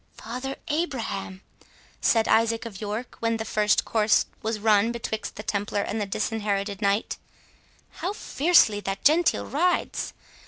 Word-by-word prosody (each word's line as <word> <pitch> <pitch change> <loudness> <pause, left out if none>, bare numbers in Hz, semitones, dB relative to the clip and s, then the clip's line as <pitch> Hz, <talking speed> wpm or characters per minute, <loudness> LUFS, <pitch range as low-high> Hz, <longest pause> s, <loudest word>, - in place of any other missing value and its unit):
"Father 250 +4 -5
Abraham!" 230 - -3 0.6
said 225 -1 +3
Isaac 230 +1 +2
of 210 -3 -8
York, 215 +4 -5
when 230 0 0
the 220 - -4
first 210 -1 +2
course 220 -1 +3 0.2
was 220 0 -2
run 215 +1 +3
betwixt 220 -2 -4
the 210 - -7
Templar 205 -1 -1
and 215 +2 -3
the 205 - -2
Disinherited 205 -1 -2
Knight, 200 +1 0 0.8
"how 365 - -2
fiercely 310 - +3
that 195 0 -5
Gentile 320 +4 +4
rides! 350 +6 0
220 Hz, 140 wpm, -26 LUFS, 205-235 Hz, 0.8 s, Gentile